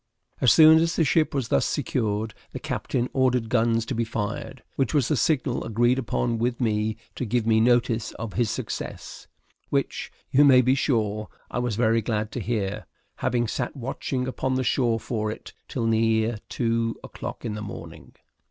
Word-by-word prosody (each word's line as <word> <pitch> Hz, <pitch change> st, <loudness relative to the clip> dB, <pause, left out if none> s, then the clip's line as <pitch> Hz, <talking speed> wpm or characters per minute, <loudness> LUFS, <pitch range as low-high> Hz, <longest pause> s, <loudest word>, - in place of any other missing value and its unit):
As 125 Hz, -, +6 dB
soon 160 Hz, 0 st, +8 dB
as 165 Hz, +1 st, +1 dB
the 165 Hz, -, +3 dB
ship 155 Hz, +3 st, +2 dB
was 135 Hz, -5 st, -2 dB
thus 70 Hz, -, +3 dB
secured, 110 Hz, -2 st, -1 dB, 0.2 s
the -, -, -4 dB
captain 125 Hz, -1 st, -2 dB
ordered 125 Hz, -3 st, +1 dB
guns 115 Hz, -1 st, +2 dB
to 125 Hz, -, -3 dB
be 115 Hz, -1 st, 0 dB
fired, 115 Hz, +2 st, -4 dB
which 135 Hz, +1 st, 0 dB
was 140 Hz, -5 st, +2 dB
the 150 Hz, -, +2 dB
signal 135 Hz, -3 st, +1 dB
agreed 120 Hz, +3 st, +2 dB
upon 120 Hz, -1 st, -1 dB
with 120 Hz, +1 st, -1 dB
me 110 Hz, -2 st, 0 dB, 0.2 s
to -, -, -4 dB
give 120 Hz, 0 st, 0 dB
me 110 Hz, -1 st, +4 dB
notice 120 Hz, -1 st, +2 dB
of 110 Hz, -2 st, -6 dB
his 120 Hz, -3 st, +1 dB
success, -, -, -6 dB, 0.4 s
which, -, -, -1 dB, 0.2 s
you 145 Hz, -, +6 dB
may 130 Hz, -3 st, +7 dB
be 130 Hz, +2 st, +4 dB
sure, 110 Hz, -6 st, 0 dB, 0.2 s
I -, -, -1 dB
was 120 Hz, -3 st, -1 dB
very 115 Hz, 0 st, +2 dB
glad 105 Hz, -1 st, -2 dB
to -, -, -4 dB
hear, 105 Hz, -2 st, -2 dB, 0.3 s
having 120 Hz, -1 st, 0 dB
sat 120 Hz, +4 st, -3 dB
watching 130 Hz, 0 st, -3 dB
upon 130 Hz, 0 st, -1 dB
the 130 Hz, -, 0 dB
shore 120 Hz, -3 st, +1 dB
for 110 Hz, -3 st, -2 dB
it 110 Hz, -, -8 dB
till 120 Hz, -4 st, -3 dB
near 110 Hz, 0 st, +2 dB
two 115 Hz, -1 st, -1 dB
o'clock -, -, -7 dB
in 110 Hz, -, -2 dB
the 105 Hz, -, -5 dB
morning. 105 Hz, -1 st, -9 dB
115 Hz, 180 wpm, -25 LUFS, 110-130 Hz, 0.4 s, soon